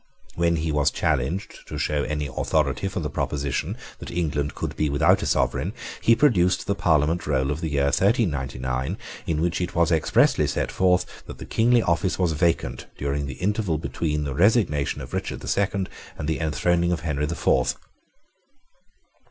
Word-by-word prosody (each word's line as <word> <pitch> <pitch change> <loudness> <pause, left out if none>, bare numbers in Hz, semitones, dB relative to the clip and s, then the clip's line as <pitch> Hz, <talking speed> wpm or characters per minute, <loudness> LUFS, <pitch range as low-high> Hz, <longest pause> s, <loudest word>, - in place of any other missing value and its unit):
When 85 0 +1
he 80 0 -1
was 75 -1 +3
challenged 70 +11 -2
to - - -6
show 75 -1 0
any 75 0 -2
authority 70 +1 0
for - - -3
the - - -2
proposition 70 -2 -2 0.2
that - - -8
England 75 -4 -1
could - - -4
be 75 - 0
without 70 0 +3
a - - -2
sovereign, 80 +11 0 0.3
he 115 - +5
produced 90 -10 +3
the 100 - +1
Parliament 80 -3 +1
roll 70 -1 +1
of 75 +2 -3
the 80 - -2
year 70 -1 +1
1399, 70 - 0 0.3
in 80 -1 0
which 85 +1 0
it 90 - -3
was 85 -1 +3
expressly 80 -2 +3
set - - -1
forth 90 -1 +3 0.2
that - - -8
the - - -8
kingly 120 +1 +3
office 90 +1 +1
was 90 -3 +1
vacant 75 -6 0
during 70 +1 -2
the 65 - -6
interval 100 - 0
between 75 -1 -2
the 70 -2 -3
resignation 85 - +2
of - - -9
Richard - - -3
the - - -8
Second 100 -1 0 0.3
and 75 - -4
the 80 - -1
enthroning 85 +2 +1
of 85 - -1
Henry 75 -2 -1
the 85 - -3
Fourth. 65 -6 +2
80 Hz, 175 wpm, -24 LUFS, 70-90 Hz, 0.3 s, he